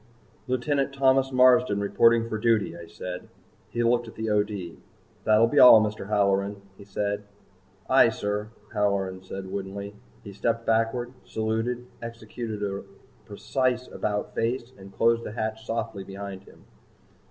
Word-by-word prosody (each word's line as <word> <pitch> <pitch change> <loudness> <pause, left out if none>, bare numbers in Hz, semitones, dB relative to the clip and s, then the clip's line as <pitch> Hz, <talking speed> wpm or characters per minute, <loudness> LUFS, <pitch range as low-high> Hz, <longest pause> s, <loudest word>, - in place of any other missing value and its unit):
"Lieutenant 135 +2 0
Thomas 135 -1 +3
Marsden 125 -4 +5
reporting 115 +3 +3
for 110 -1 -3
duty," 110 -6 +1
I 85 -1 -10
said. 90 +1 -7 0.4
He 120 - -1
looked 120 0 +2
at 115 - -11
the 110 -1 -2
O.D. 105 -5 -1 0.5
"That'll 110 +1 +5
be 140 +5 +2
all, 125 -3 +10
Mr. 105 -2 -2
Halloran," 100 -1 +1 0.2
he 100 - -13
said. 100 +1 -2 0.7
"Aye, 130 -3 +6
sir," 105 -1 -3 0.2
Halloran 100 -3 0
said 95 0 -7
woodenly. 100 +1 -5 0.3
He 100 - -9
stepped 115 +3 -1
backward, 115 +2 0
saluted, 115 +3 -2 0.2
executed 115 -2 -6
a 100 -1 -3 0.4
precise 125 +4 -1
about 105 -1 -3
face 120 +2 -2
and 95 0 -13
closed 115 +2 +2
the - - -6
hatch 110 0 -4
softly 115 -3 -3
behind 100 0 -8
him. - - -18
110 Hz, 140 wpm, -26 LUFS, 100-120 Hz, 0.7 s, all